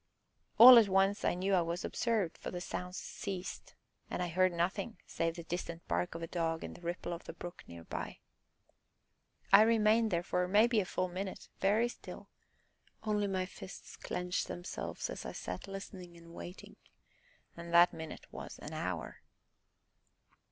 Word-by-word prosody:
All 245 +1 +12
at 215 -3 +3
once 195 +1 +3
I - - +2
knew 190 +2 0
I 185 - +5
was 170 +1 -2
observed, 220 -8 0
for - - -5
the 180 - -4
sounds 180 +1 -5
ceased, 190 -2 -6 0.3
and - - -3
I 175 - -2
heard 185 +2 +3
nothing 190 +5 -1
save 165 0 -1
the 170 - -7
distant 170 0 -5
bark 175 - -1
of 165 - -5
a - - -3
dog 165 -1 -1
and - - -6
the - - -13
ripple 175 0 -3
of 170 - -8
the - - -7
brook 175 0 -8
near 85 -1 -10
by. - - -5 1.4
I 205 - +11
remained 220 0 +4
there 170 -3 0
for, 180 +1 0
maybe, 220 +4 +4
a 195 - 0
full 185 0 -1
minute, 185 +2 -6
very 210 +5 +3
still, 240 - -10 0.7
only 210 -1 +1
my 190 -1 -1
fists 185 0 -10
clenched 180 0 -2
themselves 175 +1 -5
as - - -6
I - - -6
sat - - -6
listening 190 -3 -8
and 170 0 -14
waiting 175 +2 -9 0.8
and 170 0 -8
that 170 +1 +7
minute 160 -1 -7
was - - -7
an - - -8
hour. - - -4
180 Hz, 170 wpm, -33 LUFS, 170-200 Hz, 1.4 s, All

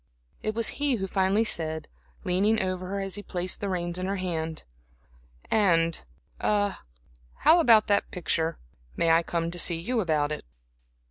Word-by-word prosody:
It 215 0 -3
was 230 -1 +4
he 285 -3 +2
who 195 -4 -3
finally 195 +3 +1
said, 160 -6 -1 0.4
leaning 200 +5 +2
over 185 -1 -2
her 200 +1 -3
as 195 -1 -4
he 205 - -3
placed 185 -2 -4
the 200 - -2
reins 175 -1 -2
in 185 - -2
her 195 - -1
hand: 165 -4 -4 0.9
"And 170 -6 +2 0.4
a 205 -1 0 0.6
how 335 - +6
about 230 -9 +6
that 200 -1 +1
picture? 165 -2 -1 0.4
May 165 - +3
I 165 +1 +5
come 170 0 -2
to 175 - -1
see 170 0 +5
you 235 +7 -1
about 155 -6 0
it?" 150 - -4
185 Hz, 165 wpm, -27 LUFS, 170-205 Hz, 0.9 s, how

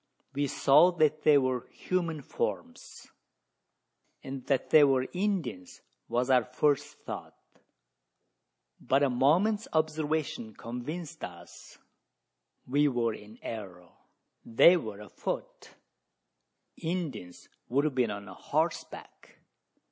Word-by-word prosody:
We 145 +1 0
saw 140 +6 +5
that 155 -2 +2
they 150 -1 +6
were 130 -2 0
human 170 -5 -2
forms; - - -5 1.2
and 135 -1 -6
that 135 -3 0
they 155 - +8
were 135 -2 +3
Indians 180 - -3 0.2
was 125 +2 0
our 125 -2 +5
first 145 +3 0
thought; - - -7 1.4
but 135 +2 +2
a 140 - +2
moment's 180 - +2
observation 155 -7 -1
convinced 140 +8 -7
us - - -10 0.9
we 145 +3 +2
were 120 -4 0
in 105 +1 -12
error. 90 -6 -7 0.5
They 145 +10 +6
were 110 - -5
afoot 105 - -6 1.0
Indians 155 - -5 0.2
would 140 +4 +2
have 155 - 0
been 125 -3 +1
on 100 -1 -6
horseback. 90 -2 -4
135 Hz, 105 wpm, -29 LUFS, 120-155 Hz, 1.4 s, they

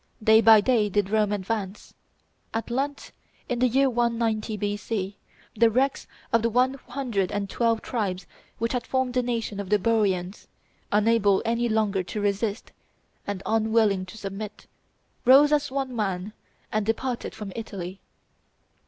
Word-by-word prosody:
Day 220 +1 +6
by 220 -1 +8
day 220 -3 +2
did 205 0 0
Rome 215 -1 +2
advance. 205 0 -4 0.6
At 230 +1 -3
length, 275 +3 -3 0.4
in 245 - -2
the 255 - +4
year 270 +3 +3
190 230 -3 0
B.C., 205 -1 -3 0.4
the 230 +1 +5
wrecks 265 +5 0 0.3
of 230 - +4
the 230 - +1
one 250 +3 +2
hundred 245 -7 -3
and 205 -1 -2
twelve 230 +2 0
tribes 195 -6 -2 0.3
which 230 +2 -1
had 245 -1 -2
formed 260 -1 0
the 250 - +2
nation 230 -4 -3
of 200 -2 -5
the 210 - +4
Boians, 200 -3 0 0.4
unable 210 -2 +3
any 235 +1 0
longer 215 -3 +1
to 180 +4 -5
resist, 205 +2 -1 0.6
and 200 -1 -4
unwilling 220 -4 +2
to 220 - -11
submit, 205 +1 -7 0.6
rose 275 +4 +7
as 295 -1 +2
one 265 -1 -3
man, 200 -2 -2 0.4
and 215 0 0
departed 235 +3 -2
from 210 -3 -7
Italy. 195 -4 -6
220 Hz, 150 wpm, -25 LUFS, 200-240 Hz, 0.6 s, by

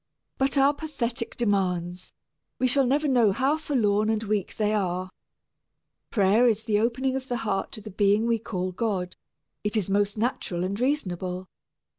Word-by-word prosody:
But 270 +1 +2
our 275 +1 +5
pathetic 250 -6 -4
demands 180 -5 -1 0.5
we 255 - +1
shall 260 +1 +3
never 290 +4 +2
know 240 -6 +4
how 265 +9 +1
forlorn 215 -9 +1
and 220 0 0
weak 210 -3 -2
they 215 -1 +1
are. 185 -2 -1 1.0
Prayer 215 +4 +4
is 220 -1 -1
the 210 -2 +1
opening 255 +4 0
of 265 0 -4
the 245 - -1
heart 200 -4 -2
to 215 - -8
the 210 - -9
being 205 +3 +3
we 230 -1 +1
call 185 -3 -3
God 185 -2 -2 0.5
it 210 +2 -1
is 195 -2 -1
most 205 +1 +1
natural 210 -6 -1
and 195 +3 -2
reasonable. 185 - -2
215 Hz, 165 wpm, -26 LUFS, 195-250 Hz, 1.0 s, our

